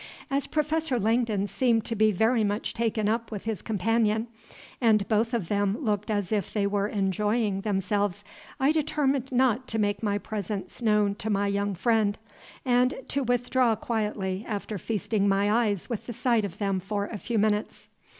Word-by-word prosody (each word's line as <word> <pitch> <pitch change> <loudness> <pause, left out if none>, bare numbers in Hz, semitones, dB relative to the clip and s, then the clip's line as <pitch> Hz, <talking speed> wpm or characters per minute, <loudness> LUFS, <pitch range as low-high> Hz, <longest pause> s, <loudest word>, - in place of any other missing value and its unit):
As 275 +1 0
Professor 305 -3 0
Langdon 220 -2 +1
seemed 230 0 +1
to 230 - -2
be 215 0 +4
very 220 +4 +2
much 205 +1 -1
taken 220 -2 0
up 230 +1 0
with 205 -3 -5
his 220 -3 -3
companion, 220 +2 +1 0.5
and 215 -4 +3
both 225 +1 +1
of 230 -9 -1
them 205 +1 +1
looked 210 -7 -1
as 205 -3 -1
if 205 -4 -1
they 205 -2 0
were 200 0 0
enjoying 205 +1 0
themselves, 205 -1 -1 0.4
I 270 +2 +4
determined 280 -4 0
not 255 0 +2
to 225 - -2
make 205 -2 0
my 205 -2 0
presence 205 +1 -5
known 210 -3 +3
to 220 - -4
my 205 -1 +1
young 200 0 -1
friend, 215 +1 +2 0.5
and 250 0 +3
to 280 - 0
withdraw 245 -1 +2
quietly 210 -4 -2
after 205 -1 -4
feasting 210 0 0
my 200 +1 +2 0.2
eyes 200 -4 -2
with 235 -4 -5
the 240 - -4
sight 235 -2 +1
of 195 -1 -7
them 195 -2 0
for 200 +2 -2
a 210 0 -6
few 235 +3 -2
minutes. 210 0 0
215 Hz, 175 wpm, -27 LUFS, 205-235 Hz, 0.5 s, be